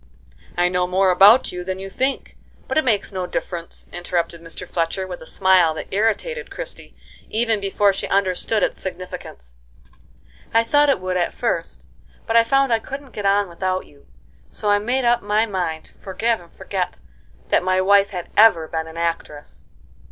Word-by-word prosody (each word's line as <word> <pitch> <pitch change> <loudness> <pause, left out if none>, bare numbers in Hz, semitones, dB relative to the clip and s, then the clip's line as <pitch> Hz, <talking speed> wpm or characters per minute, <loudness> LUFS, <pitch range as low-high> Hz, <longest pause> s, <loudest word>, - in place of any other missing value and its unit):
"I 175 0 +3
know 180 0 0
more 185 +1 +3
about 205 +7 +6
you 180 0 -5
than 185 +1 -4
you 195 0 -7
think; 265 +7 -2 0.3
but - - -3
it 310 - +3
makes 215 -6 +1
no 185 -2 -3
difference," 170 -2 -5
interrupted 170 -1 -2
Mr. 170 +2 -8
Fletcher, 170 +3 -1
with 180 -1 -8
a 160 - -11
smile 185 -4 +3
that - - -7
irritated 225 - -1
Christie, - - -8 0.3
even 225 -1 +1
before 200 0 +2
she - - -3
understood 195 +2 +1
its - - -1
significance. 180 - -8 1.0
"I 230 - +6
thought 290 +5 +3
it 275 - +3
would 185 0 -2
at 175 - -1
first, - - -2 0.4
but 225 - -1
I 230 - +7
found 270 +1 +2
I 225 - +3
couldn't 275 +3 -8
get 205 -3 -2
on 200 0 +3
without 185 +2 -2
you, 140 -1 -22 0.4
so 210 -1 -1
I 205 - +4
made 245 +5 0
up 240 0 +3
my 210 +2 +1
mind 175 -6 -3
to - - -12
forgive 220 +3 -1
and 170 - -18
forget 185 -3 -4 0.5
that - - +3
my 185 +1 +1
wife 200 +1 +4
had 180 -3 -7
ever 205 -7 +6
been 160 0 -3
an 160 +1 -10
actress." 165 -3 -4
190 Hz, 180 wpm, -21 LUFS, 180-225 Hz, 1.0 s, I